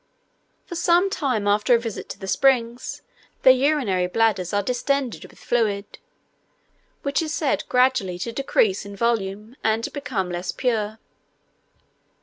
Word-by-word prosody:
For - - -8
some 350 +3 +3
time 255 - -1
after 210 +4 +4
a - - +2
visit 230 -3 -6
to - - -6
the 195 - -7
springs, 240 +3 +1 0.4
their 260 - +9
urinary 255 -10 +1
bladders 190 -3 +1
are 205 0 +1
distended 250 +2 -1
with - - -16
fluid, 215 -4 -1 1.0
which 280 +3 0
is 315 -2 -3
said 295 -1 0
gradually 250 -8 +2
to 230 +6 -4
decrease 375 - +1
in 200 0 -9
volume, 215 +1 -2
and 220 +1 +1
to - - -3
become 245 -11 -3
less 175 +1 -3
pure. 220 -4 -1
235 Hz, 140 wpm, -23 LUFS, 205-270 Hz, 1.0 s, their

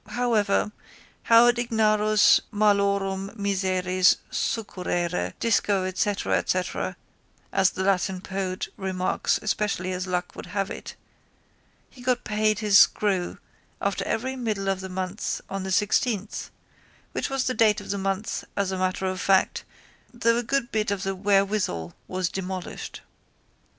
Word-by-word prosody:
However 220 -4 +1 0.5
haud 235 +1 +6
ignarus 215 -3 +4
malorum 200 -1 +1
miseris 185 -2 +2
succurrere 180 -5 -2
disco 205 -4 +2
etcetera 185 -1 -1 0.6
as 190 -1 +4
the 190 - -4
Latin 190 -1 +1
poet 190 0 -3
remarks 185 -2 0
especially 200 -3 -1
as 185 0 -3
luck 180 -1 -2
would - - -8
have 195 -1 -2
it - - -7 1.0
he 250 - -15
got 250 0 0
paid 215 0 +1
his 205 -1 +5
screw 190 -4 +2 0.4
after - - -1
every 260 +3 -2
middle 215 -6 -2
of 195 -1 0
the 190 - -6
month 185 +2 -3
on 195 0 -2
the 190 0 -4
sixteenth 210 +1 0 0.6
which - - -2
was 270 -1 0
the 255 - 0
date 220 -4 +3
of - - -6
the 200 - -1
month 195 +1 -2
as 200 -1 0
a 190 - -3
matter 185 +1 -1
of 185 0 -2
fact 190 -1 +2 0.5
though 230 -1 +2
a - - +1
good 245 +1 -1
bit 215 -2 0
of 200 -1 -2
the 195 - -1
wherewithal 195 - 0
was 185 -1 -1
demolished. 185 0 -5
195 Hz, 135 wpm, -25 LUFS, 185-215 Hz, 1.0 s, haud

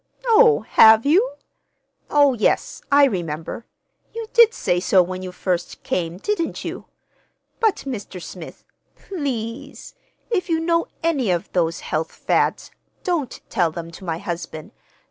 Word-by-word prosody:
"Oh, 455 -1 +5
have 220 +1 +7
you? 400 +13 +3 0.8
Oh, 285 -2 +4
yes, 220 -3 0
I 285 0 +7
remember. 170 - -4 0.5
You 460 0 -4
did 470 -2 +7
say 180 - 0
so 185 0 +4
when 185 +1 -6
you 185 -1 -6
first 180 -1 -3
came, 170 -1 -2
didn't 335 - -2
you? - - -6 0.7
But, 440 -4 +1
Mr. 205 -8 -6
Smith 170 -1 -10 0.3
please, 260 - -5 0.4
if 365 -5 0
you 325 -1 +2
know 335 0 +1 0.2
any 285 -10 +1
of 175 -1 -1
those 165 -2 0
health 160 +1 -3
fads, - - 0 0.3
don't 330 -8 -2
tell 175 -3 +1
them 165 +1 -7
to 170 - -12
my 165 -3 -3
husband. 170 +1 -6
220 Hz, 140 wpm, -22 LUFS, -, 0.8 s, have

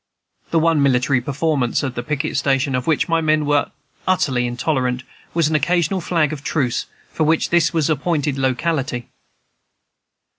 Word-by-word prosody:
The 165 - +1
one 165 -2 +3
military 130 -1 +2
performance 140 -2 0
at 130 -3 -2
the 120 - -3
picket 140 +2 -3
station 135 -1 +1
of 125 0 -2
which 160 -3 +2
my 165 -1 +1
men 155 -1 +2
were 145 0 +1 0.4
utterly 135 -9 +1
intolerant 125 0 -1 0.3
was 165 -3 +3
an 160 - -2
occasional 175 +4 +1
flag 160 -3 +1
of 140 -2 -7
truce, 130 -7 -1 0.2
for 160 - -1
which 160 +1 +1
this 170 -2 +3
was 160 -3 +1
the 155 - +3
appointed 150 -1 -1
locality. 130 -1 -1
145 Hz, 160 wpm, -20 LUFS, 130-160 Hz, 0.4 s, one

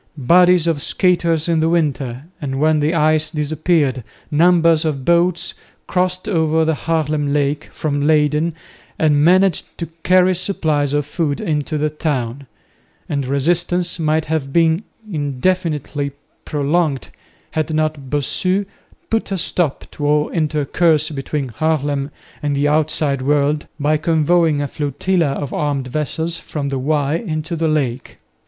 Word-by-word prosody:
Bodies 175 +5 +4
of 165 -4 0
skaters 170 -3 +1
in 165 -1 +2
the 160 +1 +2
winter, 140 -6 -1 0.2
and 135 -2 -3
when 155 +1 +3
the 150 +3 +1
ice 155 -1 +2
disappeared, 150 -3 0 0.3
numbers 165 0 +4
of 140 -5 -2
boats 170 0 +2 0.3
crossed 185 +1 -1
over 160 -4 +2
the 160 - +2
Haarlem 155 -2 -1
lake 145 +1 0
from 145 -1 -1
Leyden 155 +1 +2 0.4
and 150 -2 +3
managed 185 +1 +2
to 170 - -3 0.2
carry 185 +1 +4
supplies 155 -6 -1
of 145 -1 +1
food 145 -2 -2
into 150 0 -2
the 150 0 0
town, 140 -4 -3 0.6
and 140 -3 -2
resistance 175 +5 0
might 155 0 +1
have 150 -3 -2
been 165 +4 +2 0.2
indefinitely 150 -2 -1 0.3
prolonged 150 -1 0 0.4
had 155 0 -1
not 155 -3 -1
Bossu 185 +8 0 0.5
put 225 -2 0
a 195 - 0
stop 165 -3 -1
to 145 - -3
all 150 0 +2
intercourse 155 0 +1
between 140 -1 -3
Haarlem 145 0 -1 0.3
and 145 -1 -1
the 145 +1 +1
outside 150 -2 +1
world 145 +2 +1
by 150 +2 +2
convoying 160 -1 +2
a - - -2
flotilla 150 +2 -1
of 145 - -5
armed 140 -3 -1
vessels 160 +4 -2
from 145 -2 -4
the 135 -1 -2
Y 145 +2 0
into 160 -5 -4
the 165 0 0
lake. 135 -5 -2
155 Hz, 140 wpm, -19 LUFS, 145-165 Hz, 0.6 s, Bodies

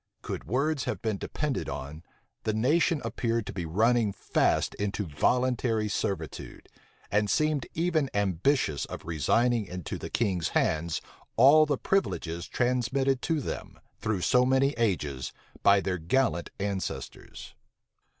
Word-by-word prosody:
Could - - -5
words 135 - 0
have - - -2
been 110 -3 0
depended 145 -3 -3
on, 70 +4 -6 0.4
the 110 - -1
nation 150 +5 +2
appeared 115 -1 -1
to - - -6
be 85 -3 -4
running 110 +5 +2
fast 95 - +1
into 105 0 -1
voluntary 115 - +1
servitude, 90 -6 -4 0.4
and 105 0 +2
seemed 155 0 +1
even 160 -4 +1
ambitious 100 - +1
of - - -8
resigning 105 - +1
into 90 -3 -5
the - - -6
king's 95 -7 0
hands 80 +1 0 0.4
all 150 +5 +7
the 145 -2 +1
privileges 85 - -1
transmitted 125 +2 +1
to 160 -3 0
them, - - -6 0.2
through 105 -4 -1
so 125 +7 +4
many 130 +2 +3
ages, 85 - -1 0.3
by 100 0 +6
their 95 -2 -2
gallant 85 -1 +1
ancestors. 100 -1 -5
110 Hz, 130 wpm, -28 LUFS, 90-130 Hz, 0.4 s, all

